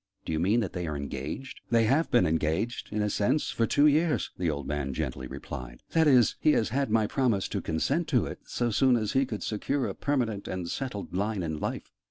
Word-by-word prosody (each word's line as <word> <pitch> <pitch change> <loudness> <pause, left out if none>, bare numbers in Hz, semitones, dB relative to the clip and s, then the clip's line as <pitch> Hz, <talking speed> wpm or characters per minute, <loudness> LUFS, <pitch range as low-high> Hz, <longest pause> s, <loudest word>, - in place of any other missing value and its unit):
"Do - - -3
you 80 - 0
mean 105 +8 +3
that 95 - -3
they 90 -2 -3
are 75 -2 -3
engaged?" 70 - -6
"They 115 -1 +4
have 140 +9 +2
been 120 -8 +4
engaged 80 +8 -1
in 105 0 0
a 105 - +1
sense 130 +11 +1
for 115 - +1
two 145 - +4
years," 155 +2 +2
the 90 -2 -1
old 70 -2 -3
man 70 -2 -2
gently 65 -1 -3
replied: 60 -2 -8
"that 160 -1 +4
is, 125 -5 +5
he 155 - +4
has 110 - +1
had 135 -1 0
my 110 0 +3
promise 115 -5 +1
to - - -2
consent 140 - 0
to 130 -6 +2
it, - - -6
so 120 -1 -1
soon 130 +4 +4
as 110 -3 0
he 135 -1 +2
could 105 -4 -5
secure 130 +5 -1
a 100 - -3
permanent 120 -8 -1
and 90 -2 -4
settled 125 -5 -4
line 100 0 -1
in 80 -2 -3
life. - - -4
110 Hz, 230 wpm, -28 LUFS, 85-130 Hz, -, is